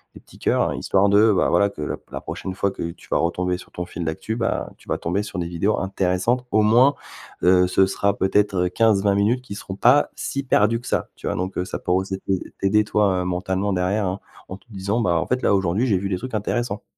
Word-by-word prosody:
les -, -, -12 dB
petits -, -, -18 dB
cœurs-là, -, -, +1 dB
histoire 100 Hz, +1 st, +2 dB
de, 105 Hz, +2 st, +5 dB
bah, 90 Hz, -, +2 dB
voilà 100 Hz, -, +3 dB
que 75 Hz, -, -9 dB
la 75 Hz, -, -3 dB
p -, -, -31 dB
la -, -, -5 dB
prochaine 95 Hz, -, -6 dB
fois 100 Hz, +1 st, 0 dB
que 85 Hz, -3 st, -5 dB
tu 85 Hz, -, -17 dB
vas -, -, +2 dB
retomber 90 Hz, +2 st, 0 dB
sur 90 Hz, -, -14 dB
ton 90 Hz, -, -5 dB
fil 85 Hz, -, -6 dB
d'actu, 95 Hz, +8 st, -3 dB
bah, 115 Hz, -1 st, -2 dB
tu -, -, -22 dB
vas -, -, -2 dB
tomber 95 Hz, +5 st, -1 dB
sur 105 Hz, -, -6 dB
des 85 Hz, -, -2 dB
vidéos 90 Hz, +5 st, 0 dB
intéressantes 95 Hz, +6 st, 0 dB
au 110 Hz, +1 st, +4 dB
moins, 120 Hz, +6 st, +5 dB, 0.5 s
heu, 90 Hz, 0 st, +5 dB
ce 95 Hz, +1 st, +3 dB
sera 100 Hz, 0 st, 0 dB
peut-être, 100 Hz, +1 st, +1 dB
heu, -, -, -3 dB
15-20 100 Hz, -1 st, +2 dB
minutes 110 Hz, +6 st, +2 dB
qui 125 Hz, -5 st, -8 dB
seront 95 Hz, -2 st, -7 dB
pas 125 Hz, +8 st, +4 dB
si 140 Hz, -, -3 dB
perdues 115 Hz, -3 st, +2 dB
que 120 Hz, -, -15 dB
ça, -, -, -1 dB
tu -, -, -12 dB
vois? -, -, -1 dB
Donc, 95 Hz, +1 st, -3 dB
heu, 90 Hz, -, -1 dB
ça -, -, -5 dB
pourrait 90 Hz, +1 st, +1 dB
aussi 95 Hz, 0 st, -5 dB
t'aid 95 Hz, -1 st, -2 dB
t'aider 105 Hz, +2 st, +3 dB
toi, 100 Hz, -3 st, +1 dB
heu, -, -, -3 dB
mentalement 95 Hz, +2 st, -1 dB
derrière 95 Hz, +3 st, 0 dB
hein 95 Hz, +2 st, -2 dB, 0.3 s
en 95 Hz, -, -6 dB
te -, -, -30 dB
disant: 100 Hz, +2 st, -2 dB
«Bah, 85 Hz, -6 st, +2 dB
en -, -, -2 dB
fait, 125 Hz, 0 st, -1 dB
là, -, -, +3 dB
aujourd'hui, 95 Hz, +6 st, +1 dB
j'ai 100 Hz, -5 st, +2 dB
vu 100 Hz, +1 st, -3 dB
des 95 Hz, -, -1 dB
trucs 125 Hz, +3 st, -6 dB
intéressants». 110 Hz, 0 st, -2 dB
100 Hz, 255 wpm, -22 LUFS, 90-105 Hz, 0.5 s, de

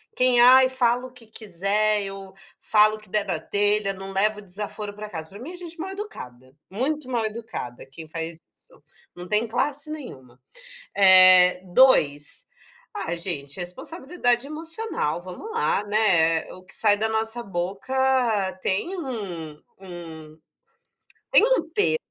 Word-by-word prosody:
Quem: 250 Hz, -1 st, +3 dB
"Ai, 255 Hz, +1 st, +7 dB
falo 250 Hz, -1 st, +1 dB
o -, -, -17 dB
que 245 Hz, -2 st, -17 dB
quiser. 210 Hz, 0 st, -1 dB
Eu 195 Hz, -1 st, -8 dB, 0.3 s
falo 215 Hz, 0 st, +4 dB
o -, -, -15 dB
que 215 Hz, -2 st, -19 dB
der 210 Hz, +1 st, 0 dB
da 175 Hz, -5 st, -2 dB
telha. 205 Hz, +1 st, +1 dB
Não 195 Hz, 0 st, -9 dB
levo 210 Hz, +2 st, 0 dB
desaforo 205 Hz, +2 st, -6 dB
para 210 Hz, +1 st, -8 dB
casa", 160 Hz, -4 st, -7 dB
para 200 Hz, -, -12 dB
mim 295 Hz, +9 st, -8 dB
é -, -, -9 dB
gente 340 Hz, -1 st, -10 dB
mal 370 Hz, +4 st, -4 dB
educada. 130 Hz, -, -9 dB
Muito 265 Hz, +7 st, -3 dB
mal 235 Hz, -3 st, 0 dB
educada 215 Hz, -, -6 dB
quem 145 Hz, +4 st, -12 dB
faz 165 Hz, +1 st, -5 dB, 0.2 s
isso. -, -, -24 dB, 0.3 s
Não 175 Hz, 0 st, -9 dB
tem 210 Hz, +4 st, +1 dB
classe 285 Hz, +6 st, 0 dB
nenhuma. 135 Hz, -, -9 dB, 0.6 s
Eh, 185 Hz, -2 st, +7 dB
2: 175 Hz, -, +3 dB, 0.5 s
Ah, 295 Hz, -, -3 dB
gente, 155 Hz, -5 st, -5 dB
responsabilidade 245 Hz, -, -2 dB
emocional, 320 Hz, -, -3 dB
vamos 185 Hz, -, -9 dB
lá, 460 Hz, -, 0 dB
né, 175 Hz, -7 st, +2 dB
eh, -, -, -10 dB
o 185 Hz, -, -15 dB
que -, -, -15 dB
sai 205 Hz, -2 st, +3 dB
da 220 Hz, +2 st, 0 dB
nossa 225 Hz, +2 st, -2 dB
boca 195 Hz, +4 st, -4 dB, 0.7 s
tem 340 Hz, -, -1 dB
um 200 Hz, -, -6 dB, 0.3 s
um 165 Hz, -4 st, -11 dB, 0.9 s
tem -, -, +6 dB
um -, -, +1 dB
peso. 415 Hz, +7 st, +1 dB
210 Hz, 150 wpm, -24 LUFS, 180-255 Hz, 0.9 s, Ai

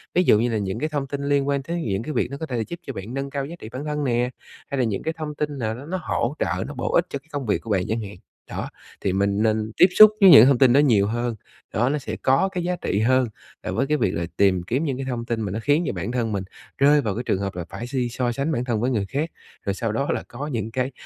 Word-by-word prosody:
ví 180 Hz, -, +4 dB
dụ 105 Hz, -, +5 dB
như 120 Hz, +2 st, +1 dB
là 115 Hz, -, 0 dB
những 95 Hz, -2 st, -3 dB
cái 155 Hz, -, -1 dB
thông 145 Hz, -3 st, -2 dB
tin 140 Hz, +1 st, -4 dB
liên 140 Hz, -1 st, +1 dB
quan 140 Hz, -1 st, 0 dB
tới 170 Hz, +4 st, -3 dB
những 100 Hz, +2 st, -1 dB
cái 155 Hz, -, -4 dB
việc 125 Hz, -, 0 dB
nó 140 Hz, -, -5 dB
có 160 Hz, -, -4 dB
thể 125 Hz, -6 st, -3 dB
là 115 Hz, -, 0 dB
giúp 170 Hz, -, -7 dB
cho 135 Hz, -, -4 dB
bạn 105 Hz, +3 st, -7 dB
nâng 135 Hz, +1 st, -3 dB
cao 140 Hz, -1 st, -3 dB
giá 165 Hz, +5 st, -8 dB
trị 110 Hz, -, -9 dB
bản 140 Hz, +4 st, -5 dB
thân 150 Hz, -1 st, -2 dB
nè, 125 Hz, -2 st, +1 dB, 0.4 s
hay 140 Hz, -, -2 dB
là 130 Hz, -, +2 dB
những 105 Hz, -5 st, -2 dB
cái 160 Hz, -, -1 dB
thông 150 Hz, -2 st, -5 dB
tin 150 Hz, -1 st, -3 dB
nào 110 Hz, -3 st, -2 dB
đó 130 Hz, +4 st, -9 dB
nó 185 Hz, +4 st, -3 dB
hỗ 130 Hz, +1 st, -1 dB
trợ, -, -, -1 dB
nó -, -, -7 dB
bổ -, -, -3 dB
ích -, -, +4 dB
cho 140 Hz, -, -4 dB
cái 145 Hz, -, -32 dB
công 145 Hz, -2 st, -3 dB
việc 105 Hz, -, 0 dB
của 115 Hz, -, -10 dB
bạn 95 Hz, -2 st, +2 dB
chẳng 110 Hz, +1 st, -1 dB
hạn. 100 Hz, -1 st, -8 dB, 0.3 s
Đó, -, -, -4 dB, 0.3 s
thì 95 Hz, -, 0 dB
mình 100 Hz, +1 st, +1 dB
nên 110 Hz, 0 st, +1 dB
tiếp 180 Hz, -, +8 dB
xúc 215 Hz, 0 st, +11 dB
với 195 Hz, -, +9 dB
những 135 Hz, -8 st, +10 dB
thông 135 Hz, -1 st, +4 dB
tin 125 Hz, -1 st, +5 dB
đó 140 Hz, -, +6 dB
nhiều 115 Hz, -9 st, +4 dB
hơn, 120 Hz, +1 st, -2 dB, 0.4 s
đó, 120 Hz, +4 st, +2 dB
nó 150 Hz, -, 0 dB
sẽ 140 Hz, -, -5 dB
có 135 Hz, +9 st, +2 dB
cái 180 Hz, -2 st, -3 dB
giá 180 Hz, +1 st, 0 dB
trị 100 Hz, -, -1 dB
hơn 130 Hz, +2 st, +3 dB, 0.4 s
là -, -, -3 dB
với 135 Hz, -, 0 dB
cái 150 Hz, 0 st, +2 dB
việc 95 Hz, -, +1 dB
là 85 Hz, -, -1 dB
tìm 95 Hz, -3 st, +3 dB
kiếm 125 Hz, -, -1 dB
những 135 Hz, -5 st, -1 dB
cái 135 Hz, -, -4 dB
thông 120 Hz, -2 st, -3 dB
tin 115 Hz, -1 st, -2 dB
mà 100 Hz, -3 st, -3 dB
nó 110 Hz, -, -3 dB
khiến 145 Hz, +4 st, +3 dB
cho -, -, -1 dB
bản 120 Hz, -, -4 dB
thân 120 Hz, -3 st, -1 dB
mình 100 Hz, -2 st, -2 dB, 0.3 s
rơi 145 Hz, +1 st, +5 dB
vào 105 Hz, -7 st, -2 dB
cái 120 Hz, -, -3 dB
trường 95 Hz, -, 0 dB
hợp 100 Hz, -2 st, -3 dB
là 90 Hz, -2 st, -4 dB
phải 120 Hz, -, -6 dB
si 125 Hz, -2 st, -1 dB
so 120 Hz, +1 st, -1 dB
sánh 140 Hz, +6 st, -1 dB
bản 125 Hz, -5 st, -1 dB
thân 115 Hz, -4 st, 0 dB
với 125 Hz, +2 st, +1 dB
người 105 Hz, -5 st, 0 dB
khác, 145 Hz, -, -2 dB, 0.4 s
rồi 100 Hz, -, 0 dB
sau 115 Hz, +2 st, -2 dB
đó 140 Hz, +6 st, -1 dB
là -, -, -2 dB
có 140 Hz, +5 st, -6 dB
những 115 Hz, -5 st, -3 dB
cái, 130 Hz, +2 st, -1 dB
125 Hz, 315 wpm, -23 LUFS, 110-145 Hz, 0.4 s, xúc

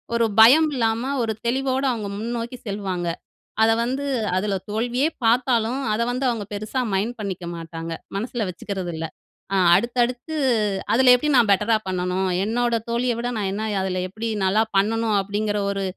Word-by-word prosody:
ஒரு 235 Hz, 0 st, +3 dB
பயம் 285 Hz, +8 st, +8 dB
இல்லாம 230 Hz, +2 st, 0 dB
ஒரு 220 Hz, -, -1 dB
தெளிவோட 265 Hz, +2 st, 0 dB
அவங்க 220 Hz, -4 st, -3 dB
முன்னோக்கி 235 Hz, +2 st, -4 dB
செல்வாங்க. 190 Hz, -4 st, -3 dB, 0.6 s
அத 225 Hz, -, +5 dB
வந்து 265 Hz, +4 st, -2 dB, 0.3 s
அதில 195 Hz, +1 st, 0 dB
தோல்வியே 240 Hz, +6 st, 0 dB, 0.2 s
பார்த்தாலும், 240 Hz, +1 st, +2 dB
அத 215 Hz, -, 0 dB
வந்து 255 Hz, +2 st, -2 dB
அவங்க 225 Hz, -4 st, -3 dB
பெருசா 215 Hz, +5 st, -2 dB
மைண்ட் 220 Hz, +5 st, -1 dB
பண்ணிக்க 190 Hz, -4 st, -4 dB
மாட்டாங்க. 165 Hz, 0 st, -7 dB, 0.3 s
மனசில 230 Hz, +1 st, -2 dB
வச்சுக்கிறது 185 Hz, 0 st, -5 dB
இல்ல. 160 Hz, 0 st, -4 dB, 0.5 s
"அ -, -, +2 dB, 0.2 s
அடுத்தடுத்து 245 Hz, -, 0 dB, 0.6 s
அதில 250 Hz, +1 st, +6 dB
எப்படி 295 Hz, +4 st, 0 dB
நான் 220 Hz, -4 st, +4 dB
பெட்டரா 210 Hz, +3 st, +3 dB
பண்ணணும்? 185 Hz, +1 st, -1 dB, 0.2 s
என்னோட 235 Hz, +2 st, 0 dB
தோழிய 240 Hz, +1 st, +1 dB
விட 240 Hz, -, -2 dB
நான் 195 Hz, -2 st, -1 dB
என்ன 215 Hz, +2 st, -3 dB, 0.2 s
அதில 185 Hz, -1 st, -1 dB
எப்படி 220 Hz, +4 st, -4 dB, 0.2 s
நல்லா 205 Hz, +4 st, +3 dB
பண்ணனும்?" 220 Hz, +1 st, +2 dB
அப்படீங்கிற 205 Hz, +1 st, -1 dB
ஒரு 195 Hz, 0 st, -2 dB
225 Hz, 155 wpm, -23 LUFS, 200-245 Hz, 0.6 s, பயம்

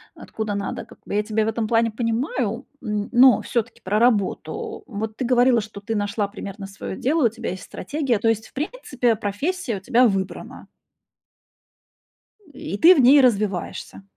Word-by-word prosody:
откуда 215 Hz, -1 st, -5 dB
надо, 200 Hz, -1 st, -4 dB
как -, -, -17 dB
бы. -, -, -4 dB
Я 210 Hz, -, +2 dB
тебя 220 Hz, 0 st, 0 dB
в -, -, -2 dB
этом 225 Hz, 0 st, -1 dB
плане 230 Hz, +1 st, +2 dB
понимаю, 235 Hz, +1 st, -2 dB, 0.2 s
м, 210 Hz, -3 st, -2 dB
но 250 Hz, +1 st, +6 dB
всё-таки 235 Hz, -1 st, -3 dB
про 200 Hz, +3 st, -1 dB
работу. 225 Hz, -5 st, 0 dB
Вот 220 Hz, -1 st, -5 dB
ты 255 Hz, -, -2 dB
говорила, 245 Hz, 0 st, +4 dB
что 210 Hz, -1 st, -9 dB
ты 225 Hz, +2 st, -3 dB
нашла 205 Hz, 0 st, -1 dB
примерно 200 Hz, 0 st, -8 dB
своё 195 Hz, -1 st, -7 dB
дело, 295 Hz, +2 st, +1 dB
у -, -, -1 dB
тебя 230 Hz, +1 st, -6 dB
есть 185 Hz, -, -7 dB
стратегия, 265 Hz, 0 st, -2 dB
то 225 Hz, -, 0 dB
есть 220 Hz, -1 st, 0 dB
в -, -, -31 dB
принципе 265 Hz, -, -1 dB
профессия 225 Hz, -, -2 dB
у -, -, -7 dB
тебя 240 Hz, +5 st, +4 dB
выбрана. 195 Hz, -2 st, -4 dB, 1.9 s
И 200 Hz, -7 st, -5 dB
ты 350 Hz, -, +7 dB
в -, -, +2 dB
ней 270 Hz, +3 st, +7 dB
развиваешься. 205 Hz, -5 st, -1 dB
225 Hz, 175 wpm, -22 LUFS, 205-250 Hz, 1.9 s, ты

